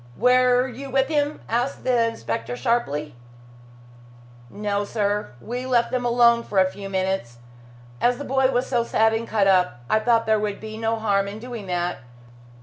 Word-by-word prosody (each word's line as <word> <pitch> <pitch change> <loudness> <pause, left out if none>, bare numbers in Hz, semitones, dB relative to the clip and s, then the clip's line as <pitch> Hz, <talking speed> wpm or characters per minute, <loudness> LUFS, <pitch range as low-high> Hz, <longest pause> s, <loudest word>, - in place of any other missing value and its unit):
"Were 250 +1 +4
you 265 +3 -8
with 270 +1 +1
him?" 295 -1 0
asked 245 +4 -1
the 240 -2 +2
inspector 115 - -4
sharply. 150 - -1 1.4
"No, 205 +2 -2
sir. 205 - -2
We 245 - -5
left 240 -2 +2
them 250 -1 -1
alone 235 -1 +4
for 210 - -6
a 190 - +6
few 195 0 -8
minutes. 190 -11 -2 0.6
As 245 0 +3
the 285 - -6
boy 265 0 +2
was 250 -1 0
so 240 -3 0
sad 225 -1 +2
and 225 +1 -2
cut 210 -2 +1
up, 180 -10 +2
I 215 - +4
thought 230 0 +2
there 220 -1 +2
would 210 -1 -3
be 215 0 -8
no 225 +1 -1
harm 200 -3 0
in 200 +1 -6
doing 230 -3 -8
that. 175 -3 -2
225 Hz, 175 wpm, -23 LUFS, 195-245 Hz, 1.4 s, a